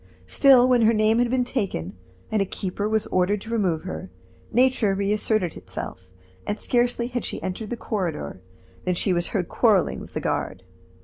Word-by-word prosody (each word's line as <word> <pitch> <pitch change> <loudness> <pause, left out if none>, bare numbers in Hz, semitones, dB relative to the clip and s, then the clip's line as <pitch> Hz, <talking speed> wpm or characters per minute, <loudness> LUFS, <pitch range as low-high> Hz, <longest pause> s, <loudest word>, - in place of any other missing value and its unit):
Still, 260 -3 +6
when 250 -2 +4
her 225 0 +4
name 215 +2 +3
had 245 -1 +2
been 255 0 +2
taken, 195 - -3 0.4
and 215 -2 +2
a - - +2
keeper 195 +2 -3
was 220 -1 +1
ordered 185 +3 +2
to 225 - -8
remove 185 -8 0
her, 80 +3 -6 0.4
nature 245 -5 +3
reasserted 200 -2 0
itself, 95 0 -8 0.4
and 205 - -2
scarcely 240 -1 +1
had 245 -1 -3
she - - -3
entered 205 +3 -4
the 240 - -3
corridor 165 - -3 0.4
than 180 -1 +1
she 185 +2 +2
was 175 0 +1
heard 185 -5 -2
quarreling 210 -7 +2
with - - -12
the - - 0
guard. - - -3
210 Hz, 180 wpm, -24 LUFS, 180-235 Hz, 0.4 s, Still